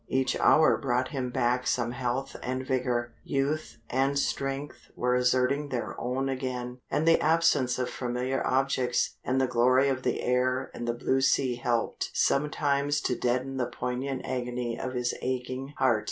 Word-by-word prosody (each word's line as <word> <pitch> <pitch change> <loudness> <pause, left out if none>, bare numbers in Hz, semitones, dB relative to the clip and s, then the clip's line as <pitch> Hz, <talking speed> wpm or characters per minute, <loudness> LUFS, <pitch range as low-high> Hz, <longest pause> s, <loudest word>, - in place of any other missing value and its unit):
Each 130 0 +1
hour 155 - +5
brought 130 -1 0
him 130 -4 -3
back 125 0 0
some 120 -1 +1
health 125 +2 -3
and 130 +1 -3
vigour. 125 -2 -1
Youth 140 +3 -1
and 135 +2 +1
strength 135 +1 -3
were 125 0 +1
asserting 130 +3 +2
their 125 -3 -3
own 130 +2 -1
again, 125 -2 -3
and 150 +3 0
the 165 - +5
absence 160 -6 +3
of 125 -1 -1
familiar 125 +1 -2
objects, 130 -2 +1
and 130 +1 +1
the 130 - +3
glory 130 +3 +3
of 130 -1 -1
the - - -1
air 130 +1 +1
and 120 - -5
the 120 - 0
blue 130 +2 +1
sea 130 -1 +3
helped 120 -1 -1
sometimes 145 0 +1
to 125 - 0
deaden 130 +2 -1
the 125 -2 0
poignant 125 +2 -3
agony 125 -2 -2
of 130 +1 -4
his 125 -1 -1
aching 130 +2 -3
heart. 120 -4 +3
130 Hz, 165 wpm, -28 LUFS, 125-135 Hz, -, hour